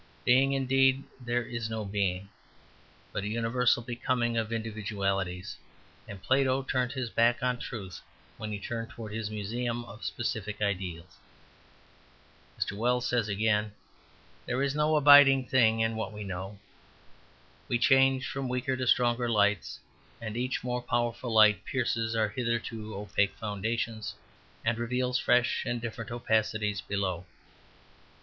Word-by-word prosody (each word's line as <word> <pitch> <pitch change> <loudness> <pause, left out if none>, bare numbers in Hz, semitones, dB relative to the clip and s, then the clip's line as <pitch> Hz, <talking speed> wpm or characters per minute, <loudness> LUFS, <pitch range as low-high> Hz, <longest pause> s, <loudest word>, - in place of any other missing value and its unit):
Being 135 +2 +4
indeed! 135 0 +3 0.2
there 120 0 -1
is 115 -1 -4
no 110 -1 -3
being, 100 -1 -1 0.8
but 100 - -2
a - - -3
universal 115 +2 +1
becoming 120 0 -1
of 115 -1 -1
individualities, 100 -5 -3 0.5
and 100 -2 -9
Plato 135 0 +2
turned 130 -1 -1
his 130 -4 -3
back 120 +2 +2
on 125 -1 0
truth 95 -9 -7 0.4
when 110 -1 -5
he 105 - -3
turned 115 +2 -5
towards 110 -4 -8
his 110 -1 -3
museum 120 +3 -3
of 115 0 -12
specific 105 -3 -3
ideals." 90 -4 -3 1.4
Mr. - - -1
Wells 120 +3 +1
says, 120 -3 +1
again, 105 0 +1 0.7
"There 125 +2 0
is 140 0 0
no 150 +1 +2
abiding 145 -2 +7
thing 115 -4 +3
in 110 0 +1
what 110 - -3
we 105 0 -7
know. 95 +1 -6 1.1
We 120 - +1
change 135 +1 +4
from 135 -2 -4
weaker 125 +1 -1
to 130 -1 -3
stronger 120 0 +3
lights, 105 -3 +1 0.4
and 110 -1 -6
each 125 +1 -2
more 125 0 -2
powerful 120 0 -1
light 105 -2 +5
pierces 115 -3 -1
our 110 -1 +2
hitherto 115 -2 -3
opaque 100 0 0
foundations 110 0 -3 0.5
and 115 0 +1
reveals 125 +1 0
fresh 125 0 +2
and 120 0 -2
different 115 -1 -6
opacities 110 -3 0
below." 95 -3 -3
115 Hz, 140 wpm, -29 LUFS, 105-125 Hz, 1.4 s, abiding